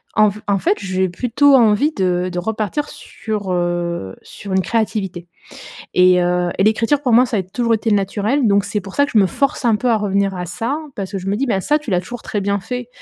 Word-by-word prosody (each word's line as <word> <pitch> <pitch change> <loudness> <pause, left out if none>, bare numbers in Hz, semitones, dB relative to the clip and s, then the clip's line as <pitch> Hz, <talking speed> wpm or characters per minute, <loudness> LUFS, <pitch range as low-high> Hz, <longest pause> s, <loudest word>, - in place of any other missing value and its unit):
en 215 -1 +5
f 205 +1 -8
en 200 -1 +1
fait, 380 - +1
je 185 -1 -3
vais 190 - +2
plutôt 250 +9 +3
envie 235 +4 +4
de 180 - 0
de 180 - -3
repartir 220 +8 -2
sur, 210 -3 -6
heu 175 - -2
sur 200 - -10
une 190 - +3
créativité 195 -5 -2 0.7
et 180 0 +5
heu, 175 0 +1
et - - +1
l'écriture 230 +7 +2
pour 250 -4 +1
moi, 245 +3 +6
ça 230 - -2
a - - 0
toujours 230 +5 -1
été 225 +1 -1
naturel, 205 +6 0
donc 200 -1 +3
c'est 210 - -2
pour 195 0 -11
ça 285 - +3
que 285 - -5
je 220 - +4
me 195 - +5
force 270 +9 -1
un 225 -2 +4
peu 245 +4 -1
à 225 - +3
revenir 200 -1 0
à 180 -1 -5
ça 225 - -3 0.2
parce 195 -2 -4
que 195 - -2
je 185 - -8
me 200 +1 0
dis: 265 - 0
«Ben 195 -6 0
ça, 295 +10 +1
tu 300 -6 -8
l'as 180 -2 +2
toujours 240 +6 -9
très 205 - -3
bien 200 +1 0
fait, 245 +3 -5
205 Hz, 250 wpm, -18 LUFS, 185-235 Hz, 0.7 s, moi